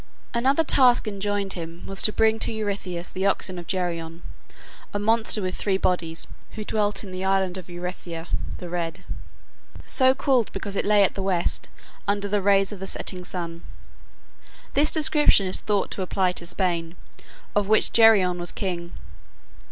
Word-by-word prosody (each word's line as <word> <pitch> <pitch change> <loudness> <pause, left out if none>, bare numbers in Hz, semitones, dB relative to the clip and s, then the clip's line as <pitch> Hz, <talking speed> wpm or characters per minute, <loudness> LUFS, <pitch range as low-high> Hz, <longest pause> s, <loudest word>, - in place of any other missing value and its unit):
Another 265 +7 +2
task 250 -6 +4
enjoined 200 -1 -2
him 170 0 -8
was 195 0 -1
to 215 - +3
bring 220 +1 +2
to - - 0
Eurystheus 200 -5 -4
the 190 +1 -1
oxen 185 -2 -1
of 170 - -10
Geryon, 170 -3 -3 0.7
a - - +2
monster 220 0 +2
with 185 0 -2
three 195 -2 0
bodies, 170 -3 0 0.3
who 215 - -5
dwelt 205 -2 -1
in 195 - -9
the 185 0 -5
island 190 -1 +1
Erytheia 175 -2 -6 0.3
(the 180 - -8
red), 170 -1 -4 0.8
so 260 -1 +4
called 260 -5 +1
because 200 -2 -5
it - - 0
lay 205 -1 +5
at 195 - +2
the 195 - -4
west, 185 -3 -1 0.4
under 200 0 0
the 205 0 0
rays 195 0 +3
of 205 - -7
the 195 - -5
setting 185 -1 -3
sun. 170 -2 -6 1.1
This 295 +2 +4
description 300 - +4
is 185 - -1
thought 205 -2 0
to - - -3
apply 185 0 +1
to 175 -1 -3
Spain, 170 -3 -1 0.6
of 205 -1 +2
which 215 +1 +3
Geryon 200 -6 +5
was 175 - 0
king. 175 -3 -4
195 Hz, 165 wpm, -24 LUFS, 180-210 Hz, 1.1 s, lay